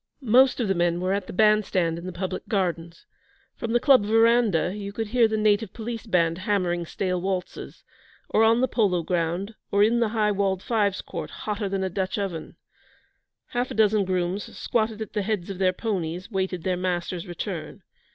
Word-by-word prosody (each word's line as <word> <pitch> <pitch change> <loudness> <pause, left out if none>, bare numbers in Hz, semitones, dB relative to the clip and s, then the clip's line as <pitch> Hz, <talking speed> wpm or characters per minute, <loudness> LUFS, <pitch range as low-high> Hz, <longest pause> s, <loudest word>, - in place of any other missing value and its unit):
Most 260 +4 +5
of 235 - 0
the 195 - +2
men 175 -1 +1
were 185 +1 0
at 200 -2 -2
the - - -6
bandstand 190 -5 +2
in 175 - -8
the - - -4
public 185 +1 -5
gardens 170 -5 -2 0.5
from 230 - -4
the 240 - +3
Club 265 -4 +5
verandah 225 -4 +3
you 200 -1 -5
could 220 +1 -4
hear 235 0 +4
the 220 0 -1
native 215 -1 +2
Police 230 0 -6
band 170 -3 +1
hammering 180 -4 0
stale 180 0 -2
waltzes 185 -1 -4 0.4
or 220 - +3
on 225 +2 +4
the 260 - +3
polo 195 -8 +1
ground 175 +5 -1 0.2
or 200 0 +4
in 230 +3 +3
the 230 -2 +2
high 215 -1 +1
walled 195 -2 0
fives 205 -5 0
court, - - -6
hotter 210 -1 -4
than 195 0 -1
a 190 - -1
Dutch 190 +2 -2
oven. 190 -6 -4 0.9
Half 245 +1 -1
a - - -6
dozen 215 -1 +3
grooms, 185 +1 -2
squatted 220 -1 -1
at - - -13
the 210 - 0
heads 200 -3 -2
of 190 - -7
their 185 -1 +3
ponies, 185 -2 -3
waited 190 -3 -2
their 185 0 0
masters' 180 0 -2
return. 175 -2 -6
195 Hz, 190 wpm, -25 LUFS, 180-220 Hz, 0.9 s, Most